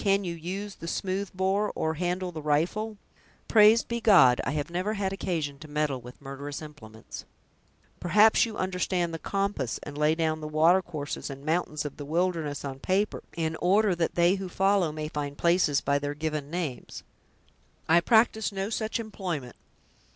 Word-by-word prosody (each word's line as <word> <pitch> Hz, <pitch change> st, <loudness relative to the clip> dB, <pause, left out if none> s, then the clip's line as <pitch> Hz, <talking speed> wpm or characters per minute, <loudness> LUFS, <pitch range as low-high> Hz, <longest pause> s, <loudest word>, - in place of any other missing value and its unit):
Can 200 Hz, 0 st, +3 dB
you 175 Hz, -2 st, -3 dB
use 190 Hz, +5 st, -5 dB
the 165 Hz, -, -9 dB
smoothbore, 190 Hz, +2 st, -1 dB
or 160 Hz, 0 st, 0 dB
handle 180 Hz, +2 st, -2 dB
the 160 Hz, -2 st, -6 dB
rifle?" 175 Hz, +9 st, 0 dB, 0.5 s
"Praised 220 Hz, +1 st, +6 dB
be 235 Hz, 0 st, -3 dB
God, 180 Hz, -, +6 dB
I -, -, 0 dB
have 145 Hz, +2 st, -3 dB
never 185 Hz, +5 st, -1 dB
had 195 Hz, -2 st, -1 dB
occasion 160 Hz, -7 st, -3 dB
to 155 Hz, -, -10 dB
meddle 145 Hz, -3 st, -1 dB
with 125 Hz, +1 st, -12 dB
murderous 140 Hz, +1 st, -6 dB
implements!" 110 Hz, -8 st, -10 dB, 0.8 s
"Perhaps 210 Hz, +6 st, +5 dB
you 225 Hz, -3 st, -3 dB
understand 180 Hz, -2 st, -1 dB
the 165 Hz, -, -4 dB
compass, 195 Hz, -, -2 dB
and 145 Hz, -, -8 dB
lay 150 Hz, +1 st, +2 dB
down 160 Hz, -1 st, -1 dB
the 155 Hz, -, -5 dB
watercourses 155 Hz, -1 st, +1 dB
and 140 Hz, +1 st, -9 dB
mountains 155 Hz, -2 st, -1 dB
of 145 Hz, -, -6 dB
the 145 Hz, -, -7 dB
wilderness 160 Hz, -2 st, -1 dB
on 135 Hz, -1 st, -6 dB
paper, 195 Hz, +7 st, 0 dB, 0.2 s
in 160 Hz, -1 st, -1 dB
order 200 Hz, +3 st, +3 dB
that 170 Hz, -1 st, -1 dB
they 175 Hz, +1 st, +4 dB
who 190 Hz, -, -5 dB
follow 195 Hz, -3 st, +2 dB
may 155 Hz, 0 st, -4 dB
find 145 Hz, -2 st, -4 dB
places 170 Hz, -5 st, +3 dB
by 140 Hz, 0 st, +1 dB
their 145 Hz, 0 st, -3 dB
given 150 Hz, -2 st, -3 dB
names?" 160 Hz, -8 st, -5 dB, 0.8 s
"I 165 Hz, +2 st, +6 dB
practice 220 Hz, +2 st, +3 dB
no 195 Hz, +2 st, -3 dB
such 220 Hz, 0 st, -2 dB
employment." 180 Hz, -, -5 dB
170 Hz, 170 wpm, -27 LUFS, 150-195 Hz, 0.8 s, Praised